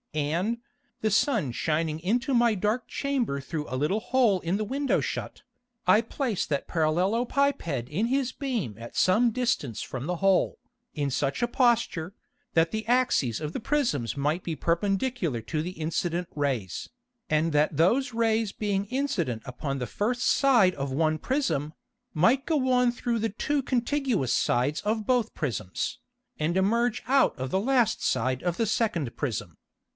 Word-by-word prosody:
And, 170 Hz, +10 st, 0 dB, 0.4 s
the 215 Hz, -2 st, 0 dB
Sun 200 Hz, -, +2 dB
shining 155 Hz, +2 st, -1 dB
into 240 Hz, +10 st, 0 dB
my 235 Hz, -2 st, +4 dB
dark 215 Hz, +5 st, -1 dB
Chamber 260 Hz, -, -1 dB
through 150 Hz, +2 st, -5 dB
a 130 Hz, -, -2 dB
little 150 Hz, +10 st, +1 dB
hole 235 Hz, -7 st, +2 dB
in 175 Hz, +4 st, 0 dB
the 215 Hz, -, -2 dB
Window 275 Hz, +5 st, 0 dB
shut, -, -, -4 dB, 0.4 s
I 185 Hz, +5 st, +6 dB
placed 230 Hz, -, -2 dB
that 140 Hz, -2 st, -1 dB
Parallelopiped 180 Hz, -, 0 dB
in 190 Hz, -, -1 dB
his 260 Hz, 0 st, 0 dB
beam 235 Hz, -, -3 dB
at 115 Hz, +1 st, -9 dB
some 220 Hz, +6 st, +4 dB
distance 225 Hz, -, -1 dB
from 130 Hz, +2 st, -5 dB
the 180 Hz, 0 st, -1 dB
hole, 195 Hz, 0 st, +2 dB, 0.4 s
in 145 Hz, -3 st, -1 dB
such 135 Hz, -, -1 dB
a 240 Hz, -, +2 dB
Posture, 235 Hz, -9 st, +1 dB, 0.4 s
that 165 Hz, 0 st, +3 dB
the 220 Hz, 0 st, -3 dB
Axes 240 Hz, -, +2 dB
of 155 Hz, 0 st, -4 dB
the -, -, -3 dB
Prisms 215 Hz, -, 0 dB
might 150 Hz, +5 st, 0 dB
be 165 Hz, -, -3 dB
perpendicular 195 Hz, -, 0 dB
to 155 Hz, +4 st, -2 dB
the 175 Hz, +3 st, -4 dB
incident 170 Hz, +2 st, -1 dB
Rays, 130 Hz, -, -2 dB, 0.4 s
and 155 Hz, +1 st, +1 dB
that 150 Hz, 0 st, +2 dB
those 240 Hz, -, +3 dB
Rays 225 Hz, -2 st, +1 dB
being 200 Hz, -1 st, -1 dB
incident 195 Hz, -, -1 dB
upon 135 Hz, +2 st, -4 dB
the 125 Hz, -2 st, -3 dB
first 240 Hz, -, -1 dB
Side 240 Hz, -10 st, +4 dB
of 140 Hz, -1 st, -3 dB
one 155 Hz, +3 st, +1 dB
Prism, 160 Hz, -, -1 dB, 0.4 s
might 230 Hz, -, +3 dB
go 275 Hz, -6 st, +1 dB
on 250 Hz, -1 st, +4 dB
through 240 Hz, -1 st, -2 dB
the 225 Hz, +1 st, 0 dB
two 290 Hz, +8 st, -1 dB
contiguous 255 Hz, -, 0 dB
Sides 135 Hz, +5 st, +1 dB
of 215 Hz, 0 st, -1 dB
both 245 Hz, -2 st, +1 dB
Prisms, 110 Hz, -10 st, -3 dB, 0.4 s
and 160 Hz, +4 st, 0 dB
emerge 220 Hz, +4 st, +2 dB
out 270 Hz, +1 st, +3 dB
of 130 Hz, 0 st, -4 dB
the 190 Hz, -, +1 dB
last 250 Hz, -1 st, +2 dB
Side 130 Hz, +1 st, 0 dB
of 175 Hz, -1 st, -1 dB
the 230 Hz, -, +1 dB
second 185 Hz, -, -1 dB
Prism. 105 Hz, -, -4 dB
190 Hz, 160 wpm, -27 LUFS, 150-240 Hz, 0.4 s, I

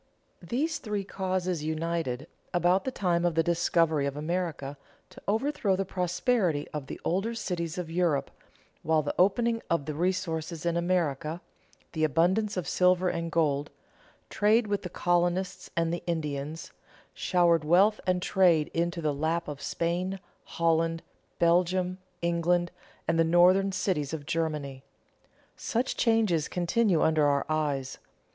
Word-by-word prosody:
These 275 Hz, -, -1 dB
three 210 Hz, -4 st, -3 dB
causes 185 Hz, -4 st, -2 dB
united, 155 Hz, -4 st, -2 dB, 0.3 s
about 175 Hz, +2 st, +3 dB
the 260 Hz, -, -1 dB
time 175 Hz, -7 st, 0 dB
of 175 Hz, -2 st, +1 dB
the 165 Hz, -, +3 dB
discovery 165 Hz, -3 st, +2 dB
of 140 Hz, +1 st, -4 dB
America, 155 Hz, -3 st, -3 dB, 0.4 s
to -, -, -13 dB
overthrow 220 Hz, -2 st, +1 dB
the 195 Hz, +1 st, -1 dB
prosperity 180 Hz, -2 st, 0 dB
of 150 Hz, -3 st, -5 dB
the -, -, -7 dB
older 195 Hz, +7 st, 0 dB
cities 175 Hz, -5 st, -3 dB
of 170 Hz, -3 st, -4 dB
Europe, 165 Hz, -5 st, 0 dB, 0.5 s
while 160 Hz, -1 st, +2 dB
the 145 Hz, -, -2 dB
opening 230 Hz, +5 st, +2 dB
of 170 Hz, -4 st, 0 dB
the 150 Hz, -, -3 dB
resources 170 Hz, -1 st, -2 dB
in 170 Hz, -1 st, +1 dB
America, 170 Hz, -3 st, 0 dB, 0.5 s
the 160 Hz, -2 st, -2 dB
abundance 185 Hz, +7 st, +2 dB
of 175 Hz, -6 st, -2 dB
silver 180 Hz, 0 st, +3 dB
and 170 Hz, -1 st, -3 dB
gold, 150 Hz, -3 st, +1 dB, 0.6 s
trade 215 Hz, +3 st, +3 dB
with 205 Hz, -1 st, -1 dB
the 180 Hz, -, -6 dB
colonists 175 Hz, +2 st, 0 dB
and 165 Hz, 0 st, +1 dB
the 175 Hz, -, -3 dB
Indians, 155 Hz, -2 st, -3 dB, 0.4 s
showered 170 Hz, -3 st, +2 dB
wealth 190 Hz, +7 st, +4 dB
and 180 Hz, -1 st, +1 dB
trade 170 Hz, -5 st, +3 dB
into 170 Hz, 0 st, -1 dB
the 150 Hz, -1 st, +1 dB
lap 160 Hz, +4 st, -1 dB
of 145 Hz, -1 st, -6 dB
Spain, 175 Hz, +5 st, -2 dB, 0.3 s
Holland, 165 Hz, 0 st, 0 dB, 0.3 s
Belgium, 180 Hz, +2 st, +2 dB, 0.2 s
England, 170 Hz, 0 st, +1 dB, 0.4 s
and 165 Hz, -, +1 dB
the -, -, +6 dB
northern 180 Hz, +4 st, +4 dB
cities 170 Hz, -6 st, -1 dB
of 145 Hz, -2 st, -8 dB
Germany. 150 Hz, -4 st, -2 dB, 0.7 s
Such 245 Hz, +3 st, -2 dB
changes 215 Hz, -9 st, +2 dB
continue 180 Hz, 0 st, +1 dB
under 155 Hz, -2 st, +3 dB
our 140 Hz, -1 st, +1 dB
eyes. 145 Hz, -4 st, -2 dB
170 Hz, 140 wpm, -28 LUFS, 160-185 Hz, 0.7 s, the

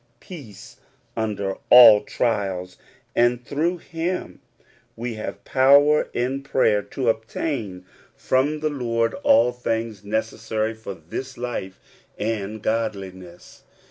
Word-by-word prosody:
105 -, -, -23 dB
peace 135 Hz, -, -11 dB, 0.4 s
under 100 Hz, -3 st, -2 dB
al\ 115 Hz, -4 st, +10 dB
trials, 95 Hz, -6 st, -2 dB, 0.4 s
and 120 Hz, +1 st, +2 dB
through 165 Hz, +5 st, -1 dB
him 170 Hz, +2 st, -4 dB, 0.5 s
we 120 Hz, +1 st, -4 dB
have 110 Hz, -1 st, -7 dB
poAver 140 Hz, +3 st, +4 dB
in 130 Hz, +3 st, -2 dB
prayer 130 Hz, -6 st, +2 dB
to 130 Hz, +4 st, -5 dB
obtain 110 Hz, -, -2 dB, 0.3 s
from 145 Hz, +4 st, 0 dB
the 155 Hz, -, 0 dB
Lord 115 Hz, -4 st, -1 dB
all 120 Hz, +2 st, +4 dB
things 115 Hz, -4 st, -3 dB
necessary 110 Hz, +1 st, -2 dB
for 110 Hz, -3 st, -8 dB
this 105 Hz, -, -7 dB
life 120 Hz, -6 st, -5 dB, 0.4 s
and 105 Hz, -1 st, -3 dB
godliness. 95 Hz, -6 st, -4 dB
115 Hz, 110 wpm, -23 LUFS, 105-130 Hz, 0.5 s, al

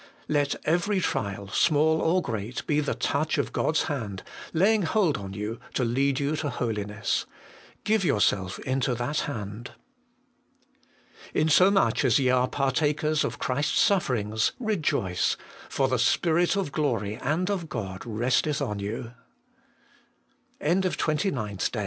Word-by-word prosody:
Let 145 Hz, -1 st, +1 dB
every 175 Hz, +5 st, +1 dB
trial, 100 Hz, -, -2 dB
small 160 Hz, +3 st, +3 dB
or 180 Hz, +2 st, +2 dB
great, 110 Hz, +1 st, -4 dB
be 150 Hz, -1 st, +1 dB
the 145 Hz, -5 st, -1 dB
touch 140 Hz, +5 st, 0 dB
of -, -, -1 dB
God's 160 Hz, -, +1 dB
hand, 105 Hz, -10 st, -4 dB, 0.3 s
laying 205 Hz, +6 st, +3 dB
hold 175 Hz, -2 st, +2 dB
on 100 Hz, -1 st, -6 dB
you, 105 Hz, +2 st, -4 dB, 0.2 s
to 130 Hz, -, +1 dB
lead 130 Hz, +3 st, +1 dB
you 145 Hz, +2 st, 0 dB
to 145 Hz, -, -2 dB
holiness. 110 Hz, -4 st, -2 dB, 0.6 s
Give 215 Hz, -1 st, +2 dB
yourself 100 Hz, -, +1 dB
into 130 Hz, -1 st, 0 dB
that 125 Hz, +6 st, -1 dB
hand. 110 Hz, 0 st, -7 dB, 1.6 s
4. -, -, +1 dB
'Insomuch 185 Hz, +4 st, +4 dB
as 125 Hz, -4 st, +4 dB
ye 130 Hz, -2 st, +2 dB
are 125 Hz, 0 st, +3 dB
partakers 150 Hz, +3 st, +1 dB
of -, -, -3 dB
Christ's 140 Hz, +4 st, 0 dB
sufferings, 110 Hz, -, +1 dB
rejoice; 155 Hz, -, 0 dB, 0.3 s
for 135 Hz, -, +1 dB
the 130 Hz, -1 st, 0 dB
Spirit 175 Hz, +2 st, +2 dB
of 195 Hz, -7 st, -1 dB
glory 115 Hz, -9 st, -1 dB
and 160 Hz, +10 st, -1 dB
of 175 Hz, -5 st, -3 dB
G 140 Hz, -, -4 dB
140 Hz, 120 wpm, -26 LUFS, 115-160 Hz, 1.6 s, Insomuch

